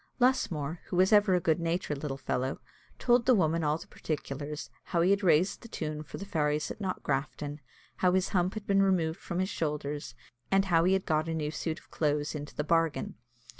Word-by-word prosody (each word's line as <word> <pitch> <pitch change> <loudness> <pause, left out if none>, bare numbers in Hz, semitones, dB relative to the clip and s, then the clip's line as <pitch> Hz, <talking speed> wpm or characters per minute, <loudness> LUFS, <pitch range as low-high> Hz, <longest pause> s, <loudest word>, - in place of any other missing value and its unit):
Lusmore, 170 - +1
who - - -5
was 185 +4 +4
ever 205 -3 +6
a - - +3
good 160 -1 +1
natured 165 -3 -1
little 135 -3 -3
fellow, 130 0 -2 0.4
told 245 0 +3
the 255 - +7
woman 165 -3 +2
all 150 +1 +2
the - - -11
particulars, 150 -1 -5
how 170 - +1
he 180 +3 +4
had 200 +1 +3
raised 180 0 +3
the - - -10
tune 155 -7 -4
for 155 - -8
the 200 - -6
fairies 150 -5 0
at - - -8
Knockgrafton, 150 -5 -2 0.4
how 180 - +3
his 190 0 +2
hump 185 -1 +1
had 215 -1 -5
been 195 -1 +3
removed 175 -5 +2
from 175 - -5
his 185 +1 0
shoulders, 150 - -3 0.3
and 195 0 +3
how 170 -3 +3
he 185 - +4
had 190 0 +1
got 155 0 +1
a 165 - -1
new 150 -1 -2
suit 160 0 -3
of - - -17
clothes 150 -1 0
into 150 -1 -7
the 150 - -1
bargain. 165 -3 +1
165 Hz, 210 wpm, -30 LUFS, 150-190 Hz, 0.4 s, the